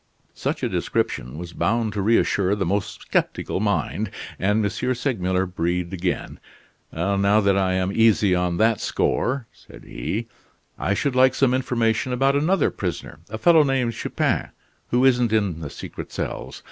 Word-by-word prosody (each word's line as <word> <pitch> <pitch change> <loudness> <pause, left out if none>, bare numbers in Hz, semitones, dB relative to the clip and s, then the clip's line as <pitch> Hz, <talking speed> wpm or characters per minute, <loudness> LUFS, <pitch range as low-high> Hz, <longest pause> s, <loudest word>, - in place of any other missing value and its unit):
Such - - -3
a - - +2
description 60 +4 -2
was 85 0 -7
bound 115 0 0
to 105 - -2
reassure 100 -2 +2
the 100 -2 -1
most 100 +3 -2
skeptical - - -1
mind, 105 +1 -1 0.3
and 105 +3 +2
M. 125 +5 -1
Segmuller 95 -8 0
breathed 90 0 -2
again: 90 -1 -3 0.5
"Now 100 +4 +2
that 100 -2 +3
I 95 -1 +1
am 95 +1 0
easy 105 -3 +4
on 90 -1 0
that 110 0 +2
score," 130 0 0
said - - -16
he, 105 - -4 0.5
"I 100 - 0
should 135 +4 -1
like 130 0 +5
some 130 -2 +3
information 120 -1 0
about 135 +2 +2
another 165 +7 +2
prisoner 85 -5 -5
a 110 - -4
fellow 165 +5 +6
named 135 -4 +1
Chupin, - - -1 0.4
who 125 +2 +3
isn't 125 -3 +3
in 100 -7 +1
the 75 -3 -6
secret - - -8
cells. - - -5
105 Hz, 160 wpm, -23 LUFS, 95-125 Hz, 0.5 s, fellow